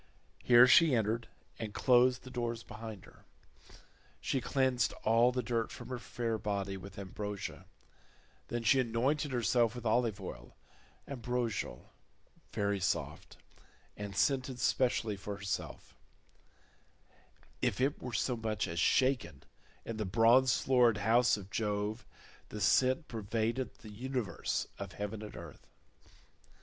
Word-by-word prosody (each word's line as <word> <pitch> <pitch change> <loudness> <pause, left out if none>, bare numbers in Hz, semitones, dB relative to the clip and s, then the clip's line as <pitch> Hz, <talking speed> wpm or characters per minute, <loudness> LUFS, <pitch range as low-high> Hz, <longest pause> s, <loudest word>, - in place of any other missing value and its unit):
Here 120 0 +8
she 150 +2 +6
entered 115 +1 0 0.3
and 110 -2 -5
closed 125 0 +4
the 130 - -10
doors 120 -2 -3
behind 110 -4 -9
her. - - -19 1.0
She 135 - -1
cleansed 130 -4 +1
all 115 +2 +4
the 125 0 -2
dirt 115 -1 -1
from - - -9
her 125 -1 -4
fair 115 -2 -3
body 100 -2 -2
with 95 +1 -10
ambrosia, 100 +1 -6 0.8
then 120 -1 -3
she 130 +4 +4
anointed 130 +5 0
herself 120 -1 +2
with 120 -1 -7
olive 115 -2 +1
oil, 60 -10 -9 0.5
ambrosial, 120 - -3 0.6
very 100 -1 0
soft, 90 - -3 0.6
and 100 -1 -6
scented 130 +3 +1
specially 120 -4 +1
for 100 +1 -5
herself—if 100 -2 -5 1.9
it 135 +3 0
were 125 - -5
so 120 +4 0
much 110 -2 -2
as 85 0 -3
shaken 115 - +2 0.4
in 115 - -5
the 110 - -1
bronze 115 +6 +4
floored 125 -4 +4
house 115 +3 +3
of 100 -1 -10
Jove, 105 +1 -2 0.4
the 105 - -6
scent 130 - +3
pervaded 115 +3 -2
the 110 - -12
universe 125 -1 -2
of - - -6
heaven 105 +1 -5
and 105 - -8
earth. - - -11
115 Hz, 130 wpm, -33 LUFS, 105-125 Hz, 1.9 s, Here